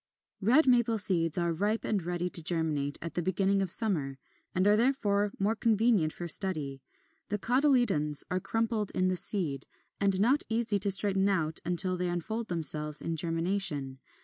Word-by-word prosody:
21. 225 +5 +1
Red 315 - +3
Maple 240 -3 +2
seeds 170 -6 +4
are 170 -1 -1
ripe 205 +6 -2
and 210 -3 -1
ready 175 +1 -4
to 175 - 0
germinate 155 -4 -1
at 170 - -7
the 175 - -2
beginning 195 +2 0
of 190 - -2
summer, 165 - 0 0.4
and 185 +1 +1
are 205 +1 +4
therefore 210 -4 0
more 205 +3 -1
convenient 220 -8 +1
for 175 - -7
study. 155 -6 -1 0.5
The 210 - -2
cotyledons 240 - +1
are 185 - -1
crumpled 225 0 -2
in 185 0 0
the 185 - -1
seed, 165 -8 -1 0.3
and 195 -1 +2
not 255 +8 +2
easy 225 -2 -1
to 200 +1 +3
straighten 195 0 +3
out 160 -5 -2
until 180 +1 0
they 180 0 -3
unfold 220 +7 -4
themselves 150 -3 +4
in 165 - -4
germination. 165 -4 -2
190 Hz, 175 wpm, -28 LUFS, 165-215 Hz, 0.5 s, seeds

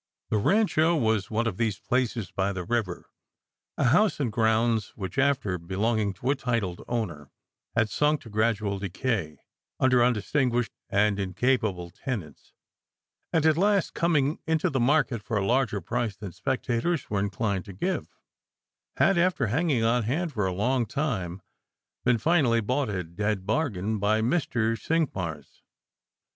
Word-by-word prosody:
The 110 - +2
Rancho 170 - +3
was 110 -8 +1
one 115 +2 0
of 105 -5 -2
these 110 -4 0
places 120 -5 -1
by 100 +1 -1
the 90 -1 -4
river; 105 -3 -2 0.7
a - - +1
house 180 - +3
and 130 -6 0
grounds 110 -1 +1
which, 95 +4 -4
after 130 -10 +1
belonging 100 +4 0
to 125 +8 -1
a - - +2
titled 115 -9 -2
owner, 85 - -3 0.5
had 115 -1 +3
sunk 150 +7 +1
to 115 - -12
gradual 105 -2 0
decay 100 -2 -2 0.4
under 130 -2 +4
undistinguished 120 +1 +1 0.2
and 100 0 +2
incapable 100 -2 0
tenants; 100 - -6 0.8
and, 160 -1 +2
at 160 -1 +4
last, 200 0 +2
coming 155 -3 +1
into 160 -1 +1
the 135 - 0
market 130 -2 +2
for 110 0 -2
a 100 - 0
larger 120 -3 +1
price 115 +2 -2
than 100 -3 -7
speculators 125 - -1
were 100 - +1
inclined 100 -1 -1
to 100 - -9
give, 185 - -2 0.9
had, 195 -3 +4
after 175 -7 +2
hanging 145 -5 +1
on 120 +2 +3
hand 150 +9 -1
for 105 -5 0
a - - -1
long 120 +6 0
time, 100 - -3 0.6
been 125 -1 +3
finally 130 -3 +3
bought 125 +3 0
a 95 -3 -2
dead 95 +3 -2
bargain 110 - -1
by 105 +2 +2
Mr. 115 -3 +1
Cinqmars. 100 - -3
115 Hz, 150 wpm, -27 LUFS, 100-135 Hz, 0.9 s, under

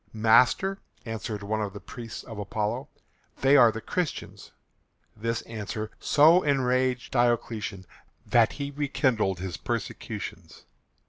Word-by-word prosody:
"Master," 125 - +4 0.3
answered 110 -2 -5
one 110 +2 -1
of 100 -2 -3
the 100 - -7
priests 115 0 -8
of 110 -3 -9
Apollo, 105 +1 -3 0.5
"they 135 +1 +5
are 120 -5 +7
the 110 - -6
Christians." 175 - -4 0.7
This 115 +2 -2
answer 110 -1 -5
so 160 +5 +5
enraged 130 -3 +1
Diocletian 115 -5 0 0.4
that 115 -2 +3
he 140 0 -4
rekindled 130 - 0
his 90 -3 -5
persecutions. - - -5
115 Hz, 120 wpm, -27 LUFS, 105-130 Hz, 0.7 s, are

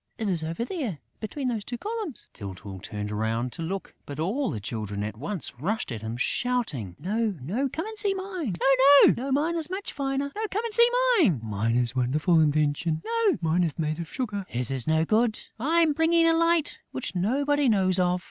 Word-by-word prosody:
It 220 - -2
is 170 -4 +1
over 165 +8 -3
there, 260 - -3 0.2
between 260 +5 -4
those 225 -4 -1
two 240 +3 -5
columns...." 425 - -5
Tyltyl 95 -1 -8
turned 105 +1 -5
round 110 +3 -1
to - - -5
look; 190 +4 -4
but 145 0 -7
all 225 - 0
the 110 - -3
Children 105 -1 -4
at 105 0 -4
once 150 - -5
rushed 200 - -2
at 115 -3 -5
him, 110 +1 -5
shouting: 145 - -1
"No, 210 +5 -1
no, 215 - -1
come 320 +7 -4
and 440 0 -6
see 405 -2 +4
mine!..." 370 - -4 0.6
"No, 270 +3 -4
mine 305 +5 +1
is 320 -1 -2
much 380 +2 -5
finer!..." 275 0 -2 1.1
"Mine 110 +2 -1
is 120 -1 +1
a - - +1
wonderful 150 +7 +2
invention!..." 155 +1 +1 0.4
"Mine 165 +2 +2
is 165 -4 -2
made 155 -1 -2
of 170 - -6
sugar!..." 210 -6 -3
"His 125 +1 -2
is 130 -3 -2
no 160 0 +3
good!..." 220 +3 +2 0.2
"I'm 320 +4 +3
bringing 330 +2 +3
a 330 - +5
light 335 -1 +2
which 260 - -4
nobody 275 +9 +1
knows 190 -3 +3
of!..." 180 0 +2
190 Hz, 185 wpm, -26 LUFS, -, 1.1 s, a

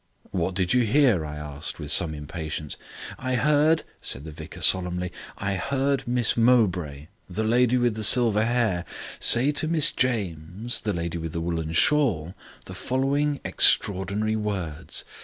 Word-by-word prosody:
"What 90 0 -2
did 95 +1 +1
you 125 - +4
hear?" 120 - +3
I 75 0 -6
asked, 75 +1 -7
with 75 -2 -4
some 80 -3 +2
impatience. 75 0 -5 0.4
"I 130 0 -2
heard," 150 +5 +3 0.2
said 65 - -3
the 80 - -8
vicar 75 - -10
solemnly, 90 -1 +1 0.3
"I 100 -2 -2
heard 140 +3 -1
Miss 120 -1 +1
Mowbray 90 - +1 0.2
(the 95 +5 -3
lady 120 +2 +3
with 120 -2 +1
the 110 0 -4
silver 110 -1 +5
hair) 110 -7 0 0.4
say 130 +5 +4
to 155 +2 -1
Miss 155 -2 +2
James 100 -2 -2
(the 105 -3 -2
lady 85 0 -3
with 80 -1 -6
the 85 - -2
woollen 80 -1 -3
shawl), 95 - +2 0.3
the - - -9
following 140 +3 -1
extraordinary 100 +3 +2
words. 95 -8 -4
105 Hz, 155 wpm, -25 LUFS, 85-125 Hz, 0.4 s, silver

